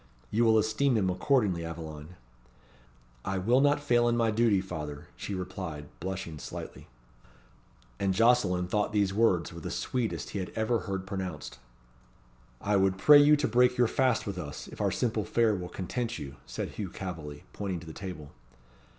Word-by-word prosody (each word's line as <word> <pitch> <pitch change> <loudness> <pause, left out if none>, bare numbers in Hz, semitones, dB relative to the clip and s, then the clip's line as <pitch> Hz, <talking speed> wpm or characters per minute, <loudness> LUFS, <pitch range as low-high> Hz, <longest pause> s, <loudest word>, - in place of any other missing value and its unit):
You 115 +2 +3
will 110 -1 +5
esteem 110 +4 +2
him 95 -3 +1
accordingly, 100 - +1
Aveline." 80 0 -7 1.1
"I 95 0 -2
will 120 +8 +3
not 145 +1 +4
fail 120 -5 +3
in 120 - +1
my 115 -1 +2
duty, 110 -2 +3
father," 75 -6 -6
she 100 - -5
replied, 90 -5 -6
blushing 90 -4 -5
slightly. - - -8 1.1
And 95 - +1
Jocelyn 95 -4 +3
thought 105 +3 0
these 100 -2 +2
words 95 -6 +2
were 85 - -8
the - - -5
sweetest 110 - -2
he 100 - -3
had 90 - -4
ever 110 +1 +1
heard 95 -1 -3
pronounced. 95 - -5 1.0
"I 105 0 +1
would 95 -1 +2
pray 145 +9 +8
you 145 +1 +7
to 145 -1 0
break 125 +3 +3
your 120 - +5
fast 130 -1 +1
with 100 -3 -4
us, 75 -5 -7
if - - -8
our - - +2
simple 115 -3 0
fare 115 0 +2
will 90 -3 -4
content 120 +6 -3
you," 70 -1 -8
said - - -4
Hugh 100 -3 -5
Calveley, 80 -6 -7
pointing 95 -4 -3
to - - -11
the 80 - -8
table. 75 -7 -7
95 Hz, 175 wpm, -29 LUFS, 90-115 Hz, 1.1 s, pray